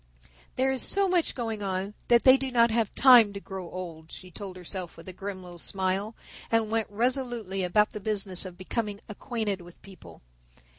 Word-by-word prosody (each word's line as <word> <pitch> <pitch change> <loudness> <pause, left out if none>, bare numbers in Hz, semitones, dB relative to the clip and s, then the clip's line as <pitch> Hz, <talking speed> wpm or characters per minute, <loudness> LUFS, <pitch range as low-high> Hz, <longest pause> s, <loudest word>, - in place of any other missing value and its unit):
There 265 +1 +2
is 265 - 0
so 395 0 +3
much 360 -3 +1
going 225 -4 -3
on 195 +1 -3
that 235 -1 +5
they 260 0 +8
do 270 0 -2
not 235 -2 +4
have 225 -2 0
time 245 -6 +7
to 200 - -5
grow 190 -3 -7
old," 165 -3 -8
she 185 -1 -10
told 190 +1 -8
herself 180 -1 -5
with 165 - -13
a 185 - -6
grim 195 0 -6
little 175 -1 -11
smile, 195 +4 -1 0.4
and 225 -1 +2
went 225 -1 0
resolutely 235 -3 -1
about 210 +4 +2
the 210 - -6
business 195 -3 -1
of 185 -2 -9
becoming 205 +2 -3
acquainted 210 -3 -3
with 175 0 -15
people. 90 - -14
205 Hz, 190 wpm, -27 LUFS, 185-235 Hz, 0.4 s, they